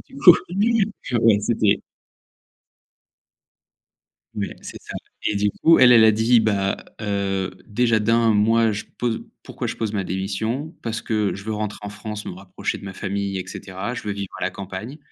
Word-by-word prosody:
Du 270 - -14
coup, 180 -10 +9 0.2
oui, 210 +3 +2 0.2
je 125 - -2
ouais, 115 -2 +5
c'était 105 -2 +2 2.6
Ouais, 100 -1 -3
c'est - - -9
ça - - -9 0.3
et 105 - +1
du 105 0 +2
coup 165 0 +7
elle, 125 -1 +7
elle 115 -2 +8
a 110 - +7
dit: 115 +2 +4
«Bah, 100 -3 +1 0.2
heu, 100 -2 -1 0.2
déjà 115 0 +2
d'1, 115 +1 +3
moi 110 +2 +3
je 105 +1 -4
pose 120 -2 -1 0.2
pourquoi - - -5
je - - -3
pose 110 -2 -2
ma 100 -2 -1
démission? 110 - -3
Parce 115 -1 -3
que 105 -3 0
je 100 - -9
veux 110 0 -3
rentrer 105 -1 -3
en 105 - -4
France, 105 0 -7
me - - -4
rapprocher 95 +1 -4
de - - -11
ma 95 - -6
famille 100 0 -3
et 90 - -4
cetera. 95 +5 -6
Je - - -5
veux 105 - -2
vivre 100 -1 -6
à - - -3
la - - +1
campagne 100 +8 -7
105 Hz, 190 wpm, -22 LUFS, 100-115 Hz, 2.6 s, coup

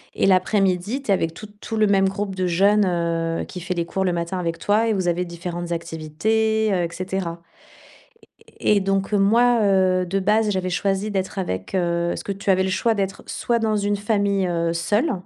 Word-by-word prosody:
et - - +2
l'après-midi, 195 +5 +1
tu 270 - -14
es - - +6
avec 165 -3 0
tout 215 - -10
tout 225 - -4
le 215 -1 +4
même 195 -1 +3
groupe 195 0 -4
de 185 -1 -1
jeunes, 200 +4 +3
heu, 170 -2 -1
qui 180 - -8
fait 180 +1 -3
les 170 -1 -2
cours 190 +2 -2
le 180 - +1
matin 170 +2 -3
avec 165 -1 -2
toi 215 +3 +2
et - - +2
vous 185 -3 -1
avez 175 +1 +1
différentes 175 0 -6
activités, 210 +7 0
heu 180 -2 +1
et 170 - -2
cetera 180 -1 -4 1.2
et 210 -1 +3
donc 195 +1 -1
heu, - - +4
moi, 235 +4 +4
heu, 185 -2 +3
de 195 +3 -1
base, 210 +2 +2
j'avais 185 -1 -1
choisi 195 +3 0
d'être 190 0 -2
avec, 95 - -4
heu 170 -1 0
parce - - -3
que 200 - -4
tu 195 +1 -5
avais 190 0 +3
le 190 - -1
choix 225 +4 +1
d'être 195 -1 -3
soit 235 - -1
dans 220 -1 0
une 205 0 0
famille, 200 -2 0
heu, 170 -1 0
seule, 205 - +1
190 Hz, 210 wpm, -22 LUFS, 175-205 Hz, 1.2 s, es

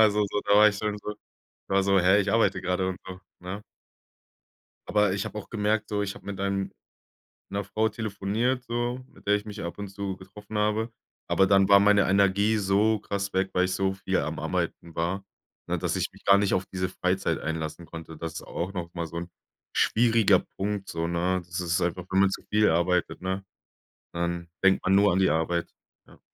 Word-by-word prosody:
also 105 -1 +4
so 105 - 0
da 100 - +4
war 105 +1 +8
ich 105 - -3
schon 105 -1 -2
so 105 - -9 0.6
da - - -1
war 100 - +5
ich 95 - -2
so: 100 -1 +4
„Hä, 95 +3 +5
ich 100 0 0
arbeite 115 -4 +3
gerade” 90 +1 0
und 95 - -4
so, 95 -1 -8 0.2
ne? 90 +4 -6 1.3
Aber 105 -2 +3
ich 100 - -1
habe 105 - -5
auch - - -8
gemerkt 105 0 0
so, 105 -1 -1
ich 95 -1 -3
hab - - -13
mit 100 -1 -5
einem 100 0 -1 0.8
'ner 100 +1 -2
Frau 110 +3 0
telefoniert 110 +4 -1
so, 120 +1 -2
mit 135 - -20
der 105 - +4
ich 105 0 -1
mich 105 -1 -7
ab 85 - -5
und 100 - -5
zu 100 0 -4
getroffen 100 +3 -10
habe. 105 +2 +1 0.4
Aber 95 - +4
dann 95 0 +4
war 100 -1 +8
meine 100 -1 +4
Energie 100 +3 +3
so 105 +2 +2
krass 100 -1 -3
weg, 95 +1 0
weil 90 0 +2
ich 95 - -3
so 95 0 +1
viel 95 - -1
am - - -2
Arbeiten 85 -1 -3
war, 90 +4 -2 0.4
ne, - - -1
dass - - -1
ich - - -1
mich - - -19
gar 100 0 +6
nicht 100 -1 +2
auf 95 - 0
diese 95 -1 -2
Freizeit 90 -2 -1
einlassen 80 +1 -4
konnte. 80 0 -9
Das 80 0 -6
ist - - -6
auch 90 +3 -4
noch 85 -3 -5
mal 85 -1 -3
so 85 +1 -6
'n 85 +1 -6 0.4
schwieriger 110 -4 +4 0.2
Punkt 100 0 -2
so, 80 0 -2
ne? 90 +2 0
Das 90 +1 -4
ist 85 -1 0
einfach 90 +1 -1
wenn 95 - +3
man 100 -1 +5
zu - - -5
viel 105 0 +4
arbeitet, 85 +2 +1
ne, 95 +1 -3 0.7
dann 85 0 -2
denkt 95 0 +4
man 95 +1 +3
nur 100 0 +5
an 90 - +2
die 95 - +4
Arbeit. 85 +1 0 0.4
Ja. - - -19
95 Hz, 215 wpm, -27 LUFS, 90-105 Hz, 1.3 s, war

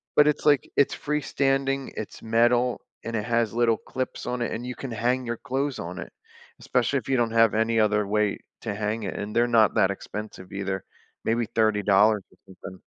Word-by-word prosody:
but 150 - +6
it's, 150 - 0
like 145 -3 +4
it's 140 - +3
freestanding, 135 -2 0
it's 110 - -6
metal, 120 +2 +2 0.2
and 115 - -3
it 105 - -1
has 115 -2 +1
little 115 -1 +3
clips 130 -1 -5
on 125 0 -2
it, 120 - -1
and 120 - -4
you 125 - -5
can 135 -3 -6
hang 125 +3 0
your 115 -1 -3
clothes 135 0 -2
on 90 +3 -6
it, - - -7 0.5
especially 125 +2 +1
if 115 - -14
you 130 - +3
don't 115 -1 +1
have 115 -1 +4
any 115 0 +2
other 105 -1 +3
way 105 -1 +1 0.2
to 105 -3 -3
hang 105 +2 -2
it, 100 - -4
and 105 +2 -5
they're 120 +1 +4
not 115 -3 +4
that 95 - +4
expensive 100 -1 -7
either, 95 -1 -3 0.4
maybe 115 +1 +1
$30 105 -1 +3
or - - -24 0.2
something. 95 0 -11
115 Hz, 200 wpm, -26 LUFS, 105-125 Hz, 0.5 s, but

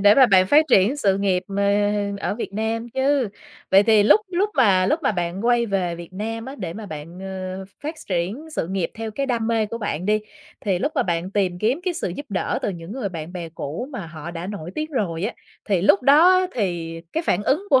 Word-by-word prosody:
để 205 +1 +7
mà 265 -2 +7
bạn 185 -4 +5
phát 295 +10 +6
triển 210 +6 +5
sự 195 -8 +2
nghiệp, 190 -2 +1
ờ, 195 - -5 0.6
ở - - -1
Việt 225 - -5
Nam 225 +2 -2
chứ. 265 -2 +2 0.4
Vậy 195 +1 +7
thì 215 -1 +5
lúc 225 - +6
lúc 385 +4 +1
mà 195 -9 +4
lúc 310 +3 +1
mà 270 - +2
bạn 175 +2 -3
quay 240 -1 +3
về 190 -4 -1
Việt 170 +1 -10
Nam 225 +4 -4
á 265 +2 -7
để 175 -5 -4
mà 215 +3 -8
bạn, 160 +1 -8
ờ, 190 0 -5
ph 195 - -24
phát 305 +3 -3
triển 200 - -2
sự - - 0
nghiệp 185 -3 -1
theo 225 0 -5
cái 275 +6 -2
đam 235 -4 0
mê 225 -2 +1
của 230 +2 -5
bạn 185 -5 -3
đi, 215 +1 +2 0.4
thì 195 -4 0
lúc 285 - -1
mà 285 - +2
bạn 170 +1 -2
tìm 190 -3 0
kiếm 235 - +1
cái 365 -2 0
sự - - -2
giúp 285 +12 -6
đỡ 195 -3 -1
từ - - 0
những 170 0 -8
người 245 -5 -3
bạn 165 -2 -7
bè 175 -3 -5
cũ 165 - -5
mà 200 -9 -5
họ 160 0 -8
đã 170 +1 -6
nổi 185 -5 -6
tiếng 310 +1 -3
rồi 180 - -2
á, 220 - -1 0.3
thì 195 -5 +1
lúc 200 +2 +5
đó 300 +7 +7
á 370 - +1
thì 170 -6 -2
cái 325 - -1
phản 185 - +2
ứng 280 - +1
của 265 - +6
205 Hz, 245 wpm, -22 LUFS, 180-245 Hz, 0.6 s, để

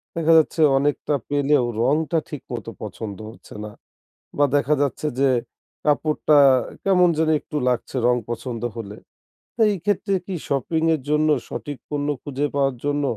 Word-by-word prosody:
দেখা 165 0 +3
যাচ্ছে 160 +1 +2 0.2
অনেকটা 145 +1 0
পেলেও 145 -2 +2 0.2
রঙটা 155 +6 +1
ঠিকমতো 120 -6 -7
পছন্দ 105 0 -6
হচ্ছে 115 - -14
না 105 - -8 0.7
বা 145 - +5
দেখা 145 +1 +2
যাচ্ছে 145 +2 -1
যে, 135 0 +4 0.6
কাপড়টা 150 0 +2 0.5
কেমন 180 -2 +4
যেন 160 0 +2
একটু 150 - -6
লাগছে 125 +2 -2
রং 125 - +4
পছন্দ 120 0 -4
হলে। 105 -3 -7 0.6
তো 230 - -2
এই 200 - -2
ক্ষেত্রে 200 0 0
কি 190 -2 -4
শপিংয়ের 160 +3 0
জন্য 150 +1 +2 0.2
সঠিক 135 +5 -5
পণ্য 145 -1 -2 0.2
খুঁজে 145 0 -2
পাওয়ার 135 -2 +1
জন্য 145 0 0
145 Hz, 145 wpm, -22 LUFS, 125-160 Hz, 0.7 s, বা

